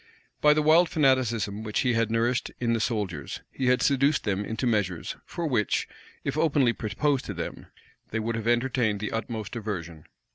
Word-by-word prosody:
By 150 0 +6
the 155 - +2
wild 165 +3 +5
fanaticism 120 -8 +1
which 110 -1 -1
he 125 -2 +2
had 115 -1 +1
nourished 115 +2 +1
in 115 -1 +1
the 115 - +1
soldiers, 105 - -2
he 130 - -2
had 125 0 +3
seduced 140 +1 +3
them 100 -1 -1
into 110 +4 -3
measures, 105 -7 0
for 170 - -4
which, 120 - +1 0.4
if - - -2
openly 145 -6 +3
proposed 130 +6 0
to 100 - -5
them, 85 - -6 0.4
they 110 - -2
would 115 +1 -2
have 115 0 -4
entertained 120 -3 +1
the 105 - -3
utmost 110 -1 -4
aversion. 85 -8 -5
115 Hz, 180 wpm, -27 LUFS, 105-130 Hz, 0.4 s, By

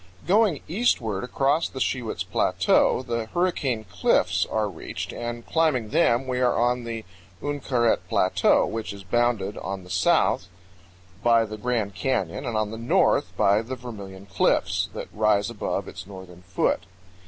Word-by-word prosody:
Going 200 -4 +3
eastward 120 - 0
across 140 +5 +1
the 130 - -7
Shiwits 125 -3 -1
Plateau - - +2
the 115 -2 -3
Hurricane 140 -7 0
Cliffs 100 -1 +1
are 110 -1 0
reached, 90 -5 -6
and 120 0 -5
climbing 150 -9 +1
them 120 +4 +3
we 125 -1 -2
are 125 -1 +2
on 120 +1 +1
the 115 -1 -5 0.3
Uinkaret 130 -4 +1
Plateau, - - +3
which 115 -2 -4
is 100 -1 -10
bounded 105 -1 0
on 95 -1 -5
the 90 - -12
south 90 0 +2 0.8
by 115 -1 +4
the 110 0 -7
Grand 110 -3 -1
Canyon 95 +2 -2
and 115 -2 -1
on 110 -1 -1
the 115 - -6
north 115 - +2
by 100 +2 +4
the 125 +3 -5
Vermilion 100 -6 -9
Cliffs, - - +1
that - - -5
rise 105 0 +2
above 110 - -3
its 90 - -9
northern 95 -3 -11
foot. 90 +1 -1
115 Hz, 155 wpm, -25 LUFS, 100-125 Hz, 0.8 s, by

